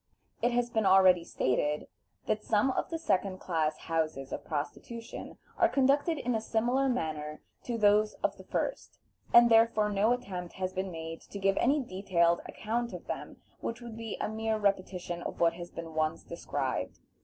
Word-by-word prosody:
It 240 - +3
has 240 0 0
been 220 -3 +2
already 185 -2 +6
stated 150 -1 0 0.4
that 215 0 -1
some 220 +5 +2
of - - -2
the 330 - -2
second 195 - 0
class 160 -4 -1
houses 155 -5 -2
of - - -4
prostitution 230 +10 -6 0.2
are - - +5
conducted 285 +4 +3
in 250 -3 -1
a 220 - 0
similar 245 +5 +1
manner 155 -9 -3 0.2
to 240 -2 -2
those 210 0 +4
of - - +1
the - - -13
first, - - -3 0.3
and 235 0 +8
therefore 225 -2 +4
no 205 +3 +3
attempt 185 -8 -3
has 185 0 -3
been 190 0 -2
made 165 -1 -6
to - - -6
give 195 0 +2
any 280 +5 +3
detailed 180 -5 +1
account 235 +2 -3
of - - -7
them, - - -6 0.2
which 230 - -4
would 235 -2 -8
be 225 -2 -5
a - - -1
mere 220 0 -1
repetition 185 -4 -1
of - - -6
what 170 -1 +4
has 175 0 -8
been 165 -1 -8
once 155 +1 0
described. 170 - -3
200 Hz, 180 wpm, -30 LUFS, 170-230 Hz, 0.4 s, and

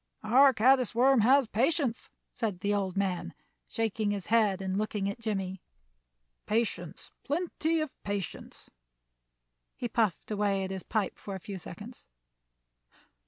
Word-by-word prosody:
Our 260 +6 +6
caddis 255 0 +3
worm 260 +2 +5
has 260 +5 +5
patience," 245 +2 0 0.2
said 205 -6 -3
the 205 +1 +1
old 195 -2 -1
man, 190 -3 -1 0.3
shaking 220 -2 -1
his 200 -3 -2
head 210 -4 +4
and 190 -1 -2
looking 210 -1 -1
at 200 +4 -4
Jimmie 195 -4 -3 0.9
"patience, 210 -7 -2
plenty 320 +1 -1
of 310 -3 -3
patience." 200 -2 -6 1.0
He 245 - -3
puffed 220 -5 0
away 200 -2 +1
at 190 - -4
his 190 -1 -4
pipe 215 -1 -2
for 200 - -6
a - - -6
few 195 +1 -7
seconds. 210 +8 -10
210 Hz, 135 wpm, -30 LUFS, 195-240 Hz, 1.0 s, Our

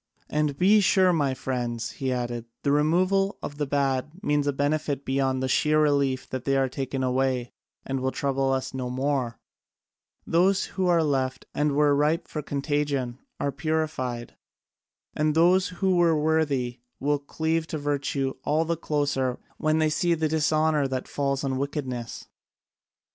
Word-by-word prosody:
"And 150 -2 0
be 200 +6 +5
sure, 185 -2 +4
my 140 -5 +1
friends," 120 -3 -3
he 130 -1 -3
added, 120 -2 -3 0.2
"the 140 - +2
removal 185 +7 +2
of 145 +1 -6
the 145 - 0
bad 135 -1 0
means 145 -3 +1
a - - +3
benefit 145 0 -1
beyond 130 -1 0
the - - +1
sheer 155 +4 +3
relief 140 -3 +1
that 130 -2 -4
they 135 0 +1
are 135 0 +2
taken 130 0 -3
away 130 -1 0 0.3
and 135 0 -2
will 130 +1 0
trouble 135 0 0
us 130 -1 -2
no 130 -1 -3
more: 130 -2 -1 0.9
those 185 +4 +3
who 185 -1 0
are 170 -2 +4
left 135 -3 -1
and 150 -1 +1
were 145 0 +4
ripe 150 +3 +1
for 150 - -4
contagion 140 -3 -2 0.2
are 140 - 0
purified, 140 -4 -2 0.8
and 150 0 +1
those 180 +3 +4
who 185 +1 0
were 165 -3 +4
worthy 145 -6 0 0.2
will 145 +1 +1
cleave 160 +3 -1
to 155 - -3
virtue 140 -2 -1
all 155 +3 +1
the 170 +1 0
closer 140 -5 -1 0.2
when 155 0 +1
they 155 -1 +2
see 170 +2 +2
the 160 -1 0
dishonour 155 -1 +2
that 130 -1 -3
falls 140 -1 -1
on 130 -1 -1
wickedness." 130 -5 -4
145 Hz, 160 wpm, -26 LUFS, 130-155 Hz, 0.9 s, be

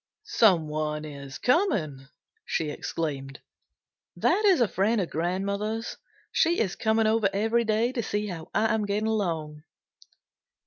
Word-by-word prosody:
"Someone 155 -6 +2
is 140 -3 -8
coming!" 175 - +1 0.4
she 155 -2 -2
exclaimed. 140 -3 -4 0.8
"That 425 - +2
is 380 -7 +5
a 240 - +4
friend 210 +4 +1
of 180 - -2
grandmother's. 200 +7 -2 0.4
She 335 +1 +2
is 195 -4 0
coming 220 0 +2
over 215 -2 +3
every 225 +4 +1
day 220 +3 +1
to 255 -3 -2
see 210 -1 -2
how 175 -5 -7
I 220 0 +2
am 215 -1 0
getting 205 +2 -1
along." 165 -9 -2
200 Hz, 135 wpm, -27 LUFS, 155-225 Hz, 0.8 s, is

